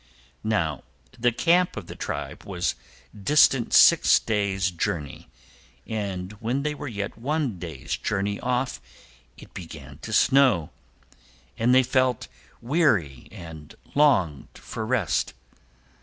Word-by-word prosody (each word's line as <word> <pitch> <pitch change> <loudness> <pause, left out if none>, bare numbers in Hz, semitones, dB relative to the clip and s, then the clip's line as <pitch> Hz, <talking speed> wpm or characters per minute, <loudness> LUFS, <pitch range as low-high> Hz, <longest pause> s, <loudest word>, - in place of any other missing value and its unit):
Now, 90 -10 -1 0.4
the 120 +1 +3
camp 175 +8 +2
of 100 - -6
the - - -9
tribe - - -5
was 90 -3 -2 0.4
distant 125 +3 +3
six - - +7
days' 100 -3 -1
journey, 80 -4 -4 0.6
and 100 -4 -4
when 120 +5 -1
they 150 0 -1
were 145 - -7
yet 100 -2 -5
one 135 - -2
day's 70 -5 -5
journey 100 0 -2
off 125 0 -2 0.6
it - - -15
began 75 -6 -10
to 115 - -8
snow, 125 - +4 0.8
and 120 +3 +3
they 130 - +6
felt 130 - +1 0.3
weary 115 - +1
and 80 -3 -11 0.2
longed 105 - +2
for 110 - -6
rest. 105 - 0
110 Hz, 120 wpm, -25 LUFS, 85-130 Hz, 0.8 s, six